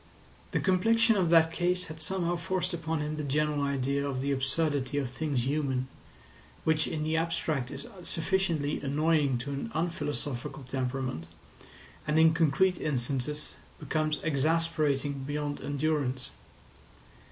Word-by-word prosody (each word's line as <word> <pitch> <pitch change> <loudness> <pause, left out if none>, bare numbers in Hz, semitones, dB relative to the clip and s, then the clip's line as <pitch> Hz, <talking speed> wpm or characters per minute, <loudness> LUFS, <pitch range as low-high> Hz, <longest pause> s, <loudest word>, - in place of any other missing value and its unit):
The - - 0
complexion 225 +4 +4
of 185 -4 +2
that 165 -1 +6
case 180 +2 +1
had 160 -1 -7
somehow 175 -1 0
forced 175 +2 -2
upon 160 -2 -2
him 150 +1 -3
the 150 - -2
general 150 +1 +1
idea 140 0 0
of 135 -2 -2
the 140 - 0
absurdity 140 0 0
of 135 -4 -1
things 135 -3 -1
human, 135 -2 0 0.8
which 160 -1 +2
in 150 - -2
the 155 +1 0
abstract 165 -5 0
is - - -7 0.2
sufficiently 165 -4 0
annoying 145 -1 +2
to 130 +4 -5
an 140 +11 -3
unphilosophical 145 -4 -2
temperament, 130 -8 -3 0.8
and 150 +1 +2
in 160 0 +6
concrete 165 +3 +3
instances 140 +1 -2 0.3
becomes 155 -1 0
exasperating 150 -2 +1
beyond 145 +1 -3
endurance. 145 -3 -1
150 Hz, 130 wpm, -30 LUFS, 140-165 Hz, 0.8 s, that